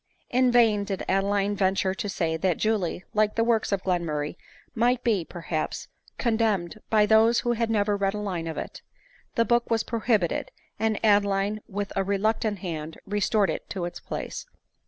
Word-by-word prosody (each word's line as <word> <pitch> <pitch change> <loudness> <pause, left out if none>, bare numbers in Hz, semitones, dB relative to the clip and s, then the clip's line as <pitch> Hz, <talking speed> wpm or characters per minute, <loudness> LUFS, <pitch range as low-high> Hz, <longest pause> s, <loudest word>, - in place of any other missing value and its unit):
In 250 0 +3
vain 225 -4 +4
did 195 -1 -4
Adeline 200 +1 +1
venture 190 -1 +1
to 205 +1 -4
say 165 -4 -1
that 175 +1 0
Julie, 205 -5 0
like 215 0 +2
the 230 - +2
works 225 -2 +1
of 195 -2 0
Glenmurray, 165 -5 -1 0.4
might 245 +2 +2
be, 215 -7 +2
perhaps, 165 -2 -4 0.3
condemned 220 -6 0
by 215 -1 +4
those 225 +2 +5
who 240 - 0
had 230 -1 0
never 205 -2 +2
read 200 0 0
a - - -3
line 185 -5 -3
of 160 - -5
it. - - -6 0.5
The 230 - +3
book 240 0 +2
was 225 -1 +2
prohibited; 220 -6 0 0.3
and 220 -1 +1
Adeline, 205 0 +2
with 205 0 -4
a 195 - +1
reluctant 205 +2 0
hand, 160 -3 -5
restored 205 -2 +1
it - - -6
to 180 -3 -3
its 175 - -6
place. - - -6
205 Hz, 175 wpm, -26 LUFS, 190-220 Hz, 0.5 s, those